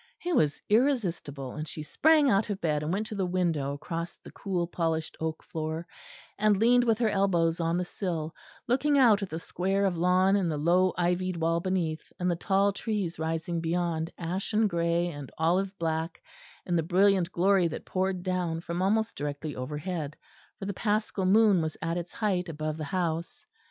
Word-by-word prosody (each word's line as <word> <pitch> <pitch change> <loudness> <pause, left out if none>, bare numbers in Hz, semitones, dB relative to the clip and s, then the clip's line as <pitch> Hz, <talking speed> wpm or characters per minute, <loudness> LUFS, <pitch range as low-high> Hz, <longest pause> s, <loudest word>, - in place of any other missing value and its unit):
It 355 -2 +1
was 145 -1 +2
irresistible, 185 - 0
and 155 +1 -5
she 155 +1 -6
sprang 310 - +4
out 215 -3 +2
of 200 -2 -2
bed 150 -4 0
and 150 +2 -2
went 205 +4 -1
to 215 - -5
the 195 - 0
window 165 -6 0
across 165 +3 -5
the - - -14
cool 185 -3 -2
polished 165 -2 -2
oak 160 0 -3
floor, 160 +1 -4 0.5
and 210 -1 +4
leaned 245 +3 +4
with 225 -2 +3
her 230 -2 +2
elbows 175 -5 +2
on 165 0 +1
the 180 - -1
sill, 165 -4 -3 0.3
looking 285 +4 +2
out 225 -6 +5
at 195 - -3
the 160 - -4
square 195 +4 -1
of 180 -4 0
lawn 185 +2 +4
and 190 -4 +1
the 155 - -1
low 180 +4 +3
ivied 180 +1 0
wall 165 +1 +1
beneath, 170 -4 -2
and 180 0 +1
the - - 0
tall 195 +3 +2
trees 200 -6 -3
rising 165 +1 -2
beyond 165 -1 -1
ashen 195 +6 0
grey 170 -1 +1
and 145 -5 -8
olive 185 +4 +1
black 165 +1 -2 0.4
in 175 - 0
the 165 - +3
brilliant 185 +1 +3
glory 185 0 +3
that 160 - -6
poured 185 -1 -1
down 180 -3 -1
from 170 +1 -4
almost 220 +4 +1
directly 145 +1 -4
overhead, 150 +3 -4 0.4
for 195 - -6
the 200 - -2
Paschal 210 -2 0
moon 205 -2 +5
was 155 -1 -3
at 165 +1 -2
its 175 0 -5
height 190 -5 -1
above 155 -1 -3
the 155 - -4
house. 170 0 -3
175 Hz, 185 wpm, -28 LUFS, 165-195 Hz, 0.5 s, out